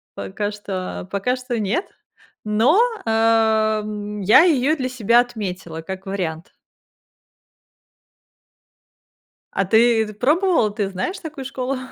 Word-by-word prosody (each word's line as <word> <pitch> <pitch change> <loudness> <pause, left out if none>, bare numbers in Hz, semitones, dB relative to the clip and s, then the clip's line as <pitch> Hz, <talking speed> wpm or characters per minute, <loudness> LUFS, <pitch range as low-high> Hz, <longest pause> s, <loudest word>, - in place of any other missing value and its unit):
пока 100 - -4
что 190 -3 -6
пока 225 +7 -1
что 250 -1 -4
нет, 220 - -1 0.6
но, 225 - +3 0.2
а, 220 -1 +2
м, 210 0 -6
я 200 +8 +7
её 305 -3 +3
для 260 -4 -3
себя 240 -1 +3
отметила 190 -9 -6
как 190 +3 -7
вариант. 175 -4 -4 3.0
А 195 - 0
ты 220 +1 +3
пробовала, 295 - +2
ты 205 -2 -2
знаешь 195 - -4
такую 300 -4 -7
школу? 265 0 -3
220 Hz, 110 wpm, -21 LUFS, 200-250 Hz, 3.0 s, я